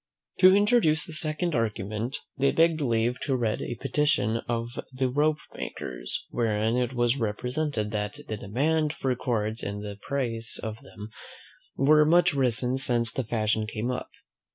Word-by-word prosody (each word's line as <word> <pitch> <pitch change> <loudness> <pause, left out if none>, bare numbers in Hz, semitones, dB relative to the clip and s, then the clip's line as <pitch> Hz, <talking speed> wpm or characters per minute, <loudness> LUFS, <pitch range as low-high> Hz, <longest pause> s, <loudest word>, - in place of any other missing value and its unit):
To 185 0 +8
introduce 200 -8 +4
the 160 - -7
second 155 +2 0
argument, 110 +1 -2 0.2
they 140 +1 +2
begged 165 -1 +3
leave 120 -1 +1
to 135 - 0
read 115 -4 -1
a 120 - -4
petition 135 -5 +1
of 115 0 -1 0.2
the 130 0 0
ropemakers, 145 - -3
wherein 110 -1 0
it 125 0 0
was 120 +1 +1
represented, 120 +1 -2
"that 105 -1 -3
the 110 - -3
demand 150 +10 0
for 130 -4 -1
cords, 110 -3 -2
and 100 +1 -5
the 100 -1 -7
price 115 -5 -2
of 110 0 -5
them, 105 +1 -10 0.7
were 150 +3 +5
much 175 +2 +4
risen 125 -1 +1
since 120 -3 +3
this 130 -4 -3
fashion 110 -1 0
came 110 +3 -3
up." 125 - -4
125 Hz, 155 wpm, -27 LUFS, 110-150 Hz, 0.7 s, To